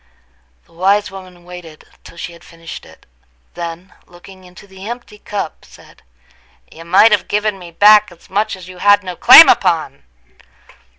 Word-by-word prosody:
The - - -28
wise 195 +4 -1
woman 185 -2 -14
waited 175 -3 -14 0.2
till - - -16
she 170 - -8
had 170 - -18
finished 165 0 -12
it—then, 65 - -13
looking 185 +1 -17
into 180 +2 -17
the 190 +1 -12
empty 235 -3 -10
cup, 205 -7 -7
said: - - -20 0.7
"You 165 +1 -14
might 190 +6 +4
have 205 -3 0
given 210 -1 -3
me 175 -1 -12
back 210 +3 +4
as 175 - -20
much 210 +2 -3
as 185 -1 -14
you 185 -1 -13
had 205 0 +3
no 180 -1 -8
claim - - +8
upon!" 70 - 0
185 Hz, 160 wpm, -15 LUFS, 170-205 Hz, 0.7 s, claim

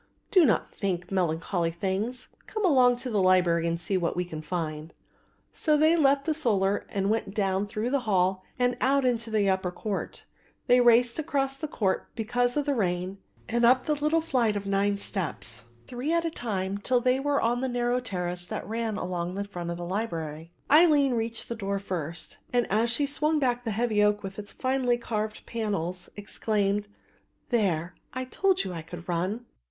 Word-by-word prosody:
"Do 365 -5 +6
not 225 - +1
think 180 -3 -3
melancholy 170 -1 0
things; 195 +8 -3 0.2
come 430 -2 -2
along 255 -7 +5
to 250 +1 -5
the 205 -3 +2
library 175 -3 +3
and 170 0 -1
see 185 +3 -1
what 170 -2 -1
we 180 - -1
can 160 -3 -7
find." 155 -1 -4 0.6
So 305 -2 +2
they 315 +2 +5
left 280 -3 +3
the 320 - +1
solar 205 -10 +1
and 195 +1 0
went 215 -3 -2
down 195 -1 +1
through 215 +4 -2
the 280 - +2
hall 190 -5 +1
and 245 -1 +2
out 275 +1 +3
into 235 -2 0
the 215 -2 +2
upper 190 -1 +1
court. 195 +3 -5 0.4
They 245 0 +5
raced 240 +2 +4
across 275 -3 0
the 310 +3 -5
court, 195 -9 -1
because 245 +3 0
of 290 - +1
the 290 - +1
rain, 185 -3 -1 0.3
and 235 +1 0
up 250 +2 +5
the 305 - +2
little 300 +2 +1
flight 250 -9 +1
of 200 -1 -3
nine 200 +1 +1
steps, 150 - -2 0.2
three 250 +5 -3
at 335 0 +2
a 330 - -1
time, 200 - -3
till 245 +4 +2
they 255 +2 +2
were 285 +1 +1
on 240 +2 +1
the 260 - -1
narrow 245 0 +1
terrace 180 -6 -4
that - - -5
ran 225 -1 -2
along 180 -1 -3
the 200 - -2
front 175 -4 -6
of 170 - -3
the 175 - -5
library. 165 -5 -4 0.2
Aline 295 -4 +6
reached 230 -1 -3
the - - -3
door 200 -3 -2
first, 175 -4 -5
and, 245 -1 +2
as 225 +3 +2
she 260 +5 +1
swung 300 +2 +1
back 245 -4 +1
the - - -1
heavy 215 -1 +1
oak 210 0 +2
with 195 +1 -6
its 205 -1 -8
finely 255 -2 +1
carved 215 -2 -4
panels, 190 -6 -3
exclaimed: 205 0 -1 0.6
"There, 185 -8 +1 0.2
I 255 0 -2
told 380 +8 +1
you 185 - -5
I 165 - -5
could 170 +1 -10
run." 185 +7 -2
215 Hz, 190 wpm, -27 LUFS, 185-250 Hz, 0.6 s, Do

